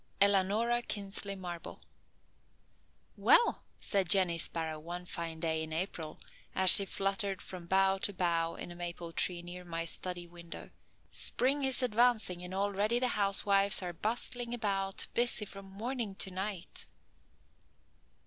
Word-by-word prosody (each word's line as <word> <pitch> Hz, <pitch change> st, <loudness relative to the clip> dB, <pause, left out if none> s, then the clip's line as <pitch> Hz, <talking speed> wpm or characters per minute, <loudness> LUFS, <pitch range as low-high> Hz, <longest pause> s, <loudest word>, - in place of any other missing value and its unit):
ELANORA 205 Hz, +5 st, +3 dB
KINSLEY 200 Hz, -2 st, -2 dB
MARBLE. 175 Hz, -3 st, -8 dB, 1.4 s
"Well," 475 Hz, -, +3 dB
said 195 Hz, -4 st, 0 dB
Jenny 180 Hz, -3 st, +3 dB
Sparrow 160 Hz, -1 st, -2 dB
one 175 Hz, +3 st, -7 dB
fine 165 Hz, -3 st, -6 dB
day 160 Hz, -1 st, -1 dB
in 160 Hz, 0 st, -6 dB
April, 160 Hz, -2 st, -4 dB, 0.4 s
as 190 Hz, -1 st, +10 dB
she 200 Hz, -, +10 dB
fluttered 195 Hz, +1 st, -2 dB
from 180 Hz, -2 st, -9 dB
bough 195 Hz, +1 st, +2 dB
to 205 Hz, -, +2 dB
bough 170 Hz, -3 st, -1 dB
in -, -, -7 dB
a -, -, -9 dB
maple 175 Hz, -1 st, -6 dB
tree 175 Hz, 0 st, -1 dB
near 180 Hz, +1 st, -8 dB
my 165 Hz, -1 st, -5 dB
study 175 Hz, +1 st, -5 dB
window, 170 Hz, 0 st, -11 dB, 0.4 s
"spring 275 Hz, +3 st, +1 dB
is 265 Hz, -1 st, +2 dB
advancing 220 Hz, -6 st, +2 dB
and 180 Hz, +1 st, -6 dB
already 205 Hz, +3 st, 0 dB
the 250 Hz, 0 st, +1 dB
housewives 200 Hz, -1 st, +3 dB
are 175 Hz, -1 st, -5 dB
bustling 240 Hz, +5 st, -2 dB
about 195 Hz, -4 st, -2 dB
busy 240 Hz, -2 st, +2 dB
from 195 Hz, 0 st, -11 dB
morning 220 Hz, +1 st, -4 dB
till 190 Hz, -1 st, -2 dB
night. 190 Hz, -1 st, -4 dB
195 Hz, 140 wpm, -31 LUFS, 175-205 Hz, 1.4 s, as